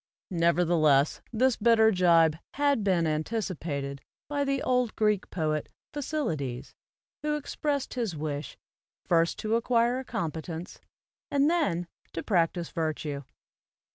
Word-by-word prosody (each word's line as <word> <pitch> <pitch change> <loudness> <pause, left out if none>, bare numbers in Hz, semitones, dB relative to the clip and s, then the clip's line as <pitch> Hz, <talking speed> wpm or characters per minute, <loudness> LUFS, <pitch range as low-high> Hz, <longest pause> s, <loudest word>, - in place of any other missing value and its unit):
Nevertheless 165 -4 +3
this 245 +2 +2
bitter 220 0 +5
jibe 170 -4 +4 0.2
had 285 -5 +2
been 180 -4 +2
anticipated 155 - -2 0.3
by 285 -1 -1
the 275 -1 0
old 250 -3 +1
Greek 210 -3 +1
poet, 155 -3 -1 0.2
Phokylides, 165 - -3 0.5
who 300 0 0
expressed 285 -1 -2
his 230 -9 -2
wish, 145 -2 -4 0.5
"first 170 -1 +2
to 220 +1 0
acquire 235 +1 +2
a - - -5
competence, 165 -6 -5 0.5
and 285 +2 +3
then 195 - +1 0.3
to 165 - -4
practise 170 -3 +1
virtue. 155 -3 -2
180 Hz, 115 wpm, -28 LUFS, 160-245 Hz, 0.5 s, bitter